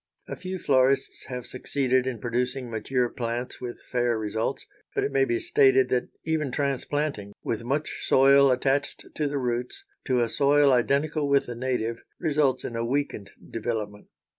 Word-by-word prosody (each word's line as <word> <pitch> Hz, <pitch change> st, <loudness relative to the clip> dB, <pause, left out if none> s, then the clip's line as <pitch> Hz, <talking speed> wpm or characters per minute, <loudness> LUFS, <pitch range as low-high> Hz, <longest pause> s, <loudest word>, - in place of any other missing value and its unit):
A -, -, -5 dB
few 185 Hz, 0 st, -5 dB
florists 135 Hz, -4 st, +2 dB
have 125 Hz, -2 st, -6 dB
succeeded 130 Hz, 0 st, 0 dB
in 130 Hz, -2 st, -2 dB
producing 125 Hz, +2 st, -2 dB
mature 120 Hz, +3 st, 0 dB
plants 120 Hz, +1 st, -4 dB
with 120 Hz, -1 st, -7 dB
fair 120 Hz, -2 st, 0 dB
results, 110 Hz, +1 st, -2 dB, 0.3 s
but -, -, +1 dB
it -, -, -1 dB
may 135 Hz, 0 st, +3 dB
be 120 Hz, -2 st, 0 dB
stated 130 Hz, -1 st, +4 dB
that 125 Hz, -1 st, 0 dB, 0.2 s
even 155 Hz, -4 st, 0 dB
transplanting, 140 Hz, -5 st, -2 dB
with 115 Hz, 0 st, -2 dB
much 140 Hz, +5 st, -2 dB
soil 140 Hz, +1 st, +6 dB
attached 135 Hz, +2 st, 0 dB
to 150 Hz, -, -1 dB
the 145 Hz, 0 st, -2 dB
roots, 125 Hz, -, -3 dB, 0.2 s
to 125 Hz, -3 st, +2 dB
a -, -, 0 dB
soil 140 Hz, +2 st, +4 dB
identical 140 Hz, +4 st, +1 dB
with 140 Hz, -1 st, +3 dB
the 120 Hz, -, -5 dB
native, 120 Hz, -2 st, -2 dB, 0.2 s
results 145 Hz, -5 st, +1 dB
in 120 Hz, -, -5 dB
a 115 Hz, -, -1 dB
weakened 125 Hz, -5 st, -2 dB, 0.2 s
development. 110 Hz, -3 st, -4 dB
130 Hz, 165 wpm, -26 LUFS, 120-140 Hz, 0.3 s, soil